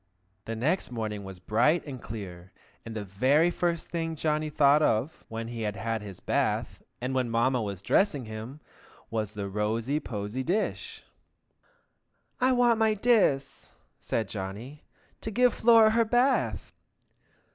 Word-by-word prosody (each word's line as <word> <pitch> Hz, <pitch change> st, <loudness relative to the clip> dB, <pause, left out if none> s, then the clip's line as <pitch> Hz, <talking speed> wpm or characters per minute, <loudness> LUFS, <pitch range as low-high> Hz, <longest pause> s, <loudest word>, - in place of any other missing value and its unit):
The 115 Hz, -, -4 dB
next 150 Hz, +11 st, 0 dB
morning 110 Hz, -4 st, -4 dB
was 95 Hz, -1 st, -9 dB
bright 120 Hz, -, +2 dB
and 130 Hz, -5 st, -7 dB
clear, 95 Hz, -5 st, -8 dB, 0.3 s
and 115 Hz, -1 st, -8 dB
the 105 Hz, -, -3 dB
very 135 Hz, -, +3 dB
first 170 Hz, -2 st, -2 dB
thing 165 Hz, -1 st, -2 dB
Johnny 155 Hz, 0 st, -1 dB
thought 145 Hz, 0 st, +4 dB
of, 130 Hz, +2 st, 0 dB
when 115 Hz, 0 st, -5 dB
he 120 Hz, -1 st, -5 dB
had 105 Hz, -2 st, -2 dB
had 115 Hz, +1 st, -2 dB
his 100 Hz, -3 st, -9 dB
bath, -, -, -1 dB, 0.2 s
and 125 Hz, +2 st, -3 dB
Mamma 125 Hz, 0 st, +1 dB
was 100 Hz, -3 st, -5 dB
dressing 150 Hz, -, +2 dB
him, 110 Hz, +7 st, -8 dB, 0.5 s
was 110 Hz, -2 st, -2 dB
the 100 Hz, -2 st, -4 dB
rosy 110 Hz, +8 st, -1 dB
posy 105 Hz, 0 st, -4 dB
dish. 185 Hz, +10 st, -2 dB, 1.4 s
"I 255 Hz, 0 st, +3 dB
wants 240 Hz, -2 st, +3 dB
my 220 Hz, -1 st, +3 dB
diss," 195 Hz, -, +1 dB, 0.3 s
said 110 Hz, -3 st, -2 dB
Johnny, 105 Hz, +9 st, -7 dB, 0.4 s
"to -, -, -4 dB
give 245 Hz, +2 st, +3 dB
Flora 225 Hz, -2 st, +6 dB
her 230 Hz, +1 st, +3 dB
bath!" 245 Hz, +4 st, +1 dB
130 Hz, 145 wpm, -28 LUFS, 110-165 Hz, 1.4 s, Flora